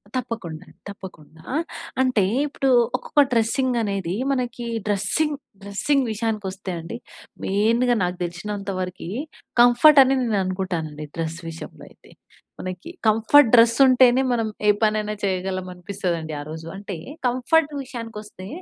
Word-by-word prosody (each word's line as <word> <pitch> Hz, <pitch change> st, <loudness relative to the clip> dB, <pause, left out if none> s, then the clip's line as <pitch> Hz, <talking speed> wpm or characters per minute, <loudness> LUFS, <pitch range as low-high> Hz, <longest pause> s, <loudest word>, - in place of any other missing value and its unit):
తప్పకుండా, 195 Hz, -10 st, -4 dB, 0.2 s
తప్పకుండా! 165 Hz, -6 st, -11 dB
ఆహ్, 320 Hz, +3 st, 0 dB, 0.4 s
అంటే 255 Hz, -6 st, +2 dB, 0.2 s
ఇప్పుడు 275 Hz, -1 st, -1 dB, 0.3 s
ఒక్కొక్క 295 Hz, -, +2 dB
డ్రెస్సింగ్ 245 Hz, +2 st, +1 dB
అనేది. 195 Hz, -4 st, -2 dB, 0.2 s
మనకి 245 Hz, -2 st, -2 dB, 0.2 s
డ్రెస్సింగ్, 210 Hz, +10 st, +1 dB, 0.2 s
డ్రెస్సింగ్ 230 Hz, +8 st, 0 dB
విషయానికొస్తే 205 Hz, -4 st, -3 dB
అండి. 170 Hz, +8 st, -7 dB, 0.5 s
మెయిన్‌గ 230 Hz, +5 st, +2 dB
నాకు 180 Hz, 0 st, -2 dB
తెలిసినంత 195 Hz, +4 st, -5 dB
వరికీ 180 Hz, -2 st, -5 dB, 0.5 s
కంఫర్ట్ 245 Hz, +5 st, +7 dB
అని 265 Hz, +1 st, +2 dB
నేను 225 Hz, -4 st, 0 dB
అనుకుంటానండి 175 Hz, -5 st, -3 dB
డ్రెస్ 165 Hz, 0 st, -3 dB
విషయంలో 165 Hz, 0 st, -10 dB
అయితే. -, -, -21 dB, 0.5 s
మనకి 185 Hz, -, -6 dB, 0.2 s
కంఫర్ట్ 225 Hz, +5 st, +5 dB
డ్రెస్ 230 Hz, 0 st, +6 dB
ఉంటేనే 255 Hz, 0 st, +5 dB
మనం 225 Hz, -2 st, 0 dB, 0.2 s
ఏ -, -, +6 dB
పనైనా 215 Hz, -1 st, +1 dB
చేయగలం 185 Hz, -1 st, -2 dB
అనిపిస్తుందండి 180 Hz, -3 st, -4 dB
ఆ -, -, -6 dB
రోజు. 160 Hz, +1 st, -7 dB
అంటే 200 Hz, -2 st, -6 dB, 0.3 s
కంఫర్ట్ 285 Hz, +5 st, +1 dB
విషయానికి 235 Hz, -4 st, -8 dB
వస్తే 190 Hz, -3 st, -11 dB
210 Hz, 125 wpm, -23 LUFS, 185-245 Hz, 0.5 s, కంఫర్ట్